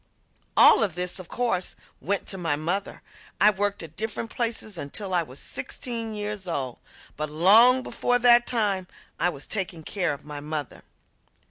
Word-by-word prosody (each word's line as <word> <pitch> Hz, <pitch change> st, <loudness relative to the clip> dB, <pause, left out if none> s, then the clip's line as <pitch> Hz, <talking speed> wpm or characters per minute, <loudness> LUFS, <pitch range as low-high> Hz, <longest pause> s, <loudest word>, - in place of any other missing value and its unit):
All -, -, +8 dB
of 190 Hz, -6 st, -1 dB
this, 180 Hz, +1 st, -2 dB
of 185 Hz, -, -9 dB
course, 230 Hz, -7 st, -1 dB, 0.2 s
went 200 Hz, +1 st, -1 dB
to 195 Hz, -, -3 dB
my 165 Hz, -4 st, 0 dB
mother. 175 Hz, +7 st, -3 dB, 0.4 s
I 210 Hz, -, +6 dB
worked 200 Hz, -1 st, -2 dB
at 160 Hz, -1 st, -11 dB
different 220 Hz, +1 st, -4 dB
places 225 Hz, -3 st, -2 dB
until 185 Hz, +6 st, -5 dB
I 175 Hz, -, +3 dB
was 135 Hz, -5 st, -9 dB
sixteen 230 Hz, -, -4 dB
years 205 Hz, -2 st, -5 dB
old, 135 Hz, -7 st, -3 dB, 0.4 s
but 155 Hz, 0 st, -3 dB
long 220 Hz, +11 st, +6 dB
before 245 Hz, 0 st, 0 dB
that 240 Hz, 0 st, +5 dB
time 200 Hz, -6 st, 0 dB, 0.3 s
I 175 Hz, -, +3 dB
was 145 Hz, -5 st, -7 dB
taking 180 Hz, -6 st, -3 dB
care 175 Hz, -4 st, -1 dB
of -, -, -17 dB
my 150 Hz, -1 st, -6 dB
mother. 150 Hz, -1 st, -5 dB
190 Hz, 165 wpm, -25 LUFS, 160-220 Hz, 0.4 s, All